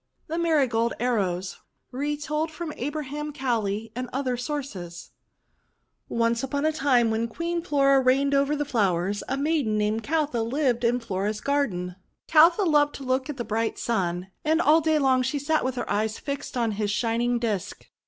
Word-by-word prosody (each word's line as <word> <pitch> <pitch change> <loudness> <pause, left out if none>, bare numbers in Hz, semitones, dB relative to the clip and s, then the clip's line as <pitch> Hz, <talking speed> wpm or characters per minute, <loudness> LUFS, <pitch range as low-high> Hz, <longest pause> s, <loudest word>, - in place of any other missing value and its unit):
THE 330 +2 -3
MARIGOLD 265 -9 +2
ARROWS 195 -7 -1 0.3
Retold 295 +3 -2
from 315 0 -6
Abraham 295 +2 -4
Cowley 225 -6 -2
and 250 0 -4
Other 260 -1 -1
Sources 240 - -6 1.0
ONCE 230 0 +1
upon 280 +2 -2
a 315 - +3
time, 260 -6 +2
when 225 +1 0
Queen 335 +8 -3
Flora 275 -5 +3
reigned 270 +2 +3
over 280 +1 +2
the 290 0 -1
flowers, 200 -6 0
a 270 - -1
maiden 280 -7 +1
named 210 +1 0
Caltha 295 -4 0
lived 245 +1 0
in 240 +1 +2
Flora's 210 -1 -2
garden. 195 -12 -1 0.3
Caltha 335 +5 +6
loved 295 -3 +3
to 275 - -8
look 260 +2 -1
at 290 - -4
the 240 - -3
bright 225 +1 -1
Sun, 185 -4 -2
and 315 +1 +2
all 320 -1 +5
day 315 0 +2
long 265 -3 +3
she 260 +3 -1
sat 305 +3 0
with 260 0 -1
her 245 - -3
eyes 215 +2 -1
fixed 280 -2 -5
on 230 -2 +1
his 210 0 -2
shining 235 +3 0
disk. 220 -6 -3
255 Hz, 170 wpm, -25 LUFS, 225-295 Hz, 1.0 s, Caltha